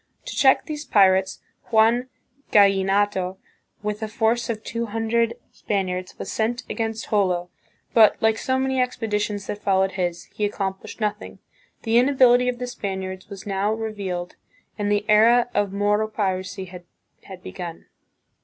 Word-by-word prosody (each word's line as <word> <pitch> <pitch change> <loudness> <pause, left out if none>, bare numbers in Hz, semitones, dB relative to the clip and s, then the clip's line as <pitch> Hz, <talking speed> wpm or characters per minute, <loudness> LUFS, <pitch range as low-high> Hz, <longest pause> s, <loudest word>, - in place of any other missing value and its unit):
To - - -6
check 265 -2 +4
these 300 -1 -5
pirates, 190 -5 +3 0.3
Juan 235 +3 +3 0.4
Gallinato, 195 -1 +3 0.5
with 210 +1 -3
a 220 - -2
force 225 +2 0
of 220 -1 -3
two 230 0 -3
hundred 225 +2 0 0.2
Spaniards, 185 -2 -3
was - - -6
sent 235 +3 -1
against 225 -1 -4
Jolo, 180 -4 +1 0.4
but, 220 -3 +6
like 220 0 +2
so 260 0 0
many 265 0 +1
expeditions 210 -5 -2
that 205 - -5
followed 190 -1 +2
his, 175 -2 -2
he 210 - -1
ac 205 - -2
complished 190 +1 -5
nothing. 210 0 -3 0.5
The 230 +1 +4
inability 250 -1 +4
of 245 - -3
the 250 - -4
Spaniards 190 -6 -5
was 200 -2 -9
now 200 +1 0
revealed 200 -5 -4 0.4
and 205 -1 -1
the 205 0 +1
era 235 +3 +5
of 205 -1 0
Moro 205 +2 +1
piracy 190 -2 -3
had 180 -1 -11 0.6
be - - -7
gun. 175 -3 -7
210 Hz, 150 wpm, -23 LUFS, 190-230 Hz, 0.6 s, but